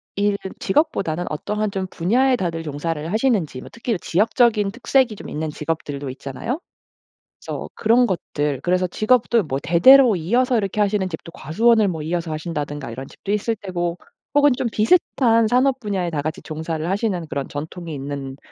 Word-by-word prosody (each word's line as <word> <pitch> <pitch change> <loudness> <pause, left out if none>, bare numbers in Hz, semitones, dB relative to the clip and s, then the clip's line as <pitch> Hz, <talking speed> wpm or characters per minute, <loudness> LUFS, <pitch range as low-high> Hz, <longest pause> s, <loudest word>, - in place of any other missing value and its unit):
일 200 0 +1 0.2
직업보다는 190 - 0
어떠한 210 +7 -2
좀 190 -1 -3
분야에 250 +9 +2
다들 170 -6 -2
종사를 155 +1 -4
하시는지 210 - 0
뭐 - - -11
특히 235 0 -2
일 - - -1
지역적인 210 +3 +2
특색이 245 +1 +1
좀 - - -10
있는 155 +1 -3
직업들도 150 -2 -4
있잖아요. 140 - -5 0.8
그래서 - - -5
그런 235 +3 +3
것들 150 - -2
그래서 180 +2 +1
직업도 225 +2 +2
뭐 135 -3 -2
대대로 245 - +7
이어서 240 +9 +1
이렇게 200 -1 -2
하시는 205 -2 +1
집도 165 0 -8
과수원을 215 +8 +2
뭐 160 -5 -3
이어서 165 +1 -2
하신다든가 150 -5 -4
이런 130 +3 -7
집도 200 - -7
있을 210 +2 0
테고 175 -2 -2 0.4
혹은 290 0 +6
좀 245 - -1
비슷한 230 -2 +3
산업 255 +3 +2
분야에 195 -6 -2
다 150 -3 -1
같이 155 +5 -4
종사를 160 0 -4
하시는 195 -2 -1
그런 140 -1 -3
전통이 160 +3 -6
있는 140 -1 -5
185 Hz, 390 characters per minute, -21 LUFS, 155-225 Hz, 0.8 s, 대대로